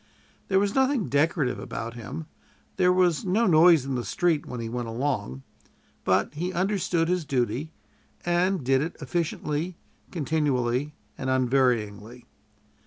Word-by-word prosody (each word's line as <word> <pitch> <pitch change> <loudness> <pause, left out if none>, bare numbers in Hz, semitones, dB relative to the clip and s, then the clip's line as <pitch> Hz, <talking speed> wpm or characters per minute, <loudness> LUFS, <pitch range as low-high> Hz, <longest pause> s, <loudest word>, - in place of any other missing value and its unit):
There 190 - +2
was 200 +1 +2
nothing 265 -5 +1
decorative 145 -3 +1
about 115 +1 -5
him; 130 +7 -7 0.5
there 180 0 +4
was 180 -3 +2
no 200 +5 +2
noise 165 - +6
in 135 - -3
the 125 -2 -2
street 160 - 0
when 125 - -6
he 115 - -4
went 120 +1 -4
along; 115 - -2 0.6
but - - +1
he 175 +5 -3
understood 180 -2 0
his 180 -1 0
duty, 135 +2 -1 0.5
and 175 -1 +1
did 130 +1 +3
it 165 +3 -3
efficiently, 160 +2 -2 0.3
continually, 145 -4 0 0.2
and 130 - -2
unvaryingly. 125 -3 0
150 Hz, 135 wpm, -26 LUFS, 125-175 Hz, 0.6 s, noise